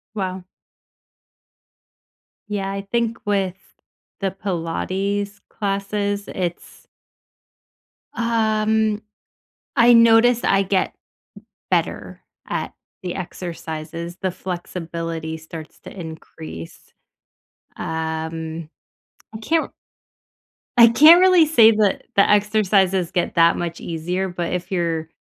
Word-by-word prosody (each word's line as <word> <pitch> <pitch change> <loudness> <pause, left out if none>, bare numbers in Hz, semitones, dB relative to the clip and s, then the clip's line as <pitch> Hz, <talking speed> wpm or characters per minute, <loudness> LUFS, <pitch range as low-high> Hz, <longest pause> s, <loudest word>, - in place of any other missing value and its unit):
Wow. 185 -2 -3 2.0
Yeah, 195 -2 -3
I 195 0 -3
think 230 -1 0
with 195 -3 0 0.6
the 195 -1 0
Pilates 195 +2 -3
classes, 200 0 -2
it's 175 -2 -5 1.3
um, 220 -2 +1 0.7
I 240 -2 +6
noticed 230 +1 +5
I 195 0 +3
get 190 -1 0 0.8
better - - -1 0.3
at - - -3 0.3
the 180 -2 -4
exercises, 170 -1 -6
the 185 -1 0
flexibility 165 -3 -5
starts 160 0 -10
to - - -11
increase, 85 - -9 1.0
um, 160 0 -4 0.7
I - - -3
can't 320 +8 +1
r - - -15 1.1
I 235 -1 +9
can't 310 +9 +8
really 365 -3 +6
say 230 -8 +6
that 210 -3 +1
the 200 - +5
exercises 200 -4 +2
get 180 -2 -1
that 170 0 +5
much 170 -1 -4
easier, 175 +3 -3
but 175 -1 -3
if 180 +1 -4
your 165 -3 -1
190 Hz, 100 wpm, -21 LUFS, 170-215 Hz, 2.0 s, I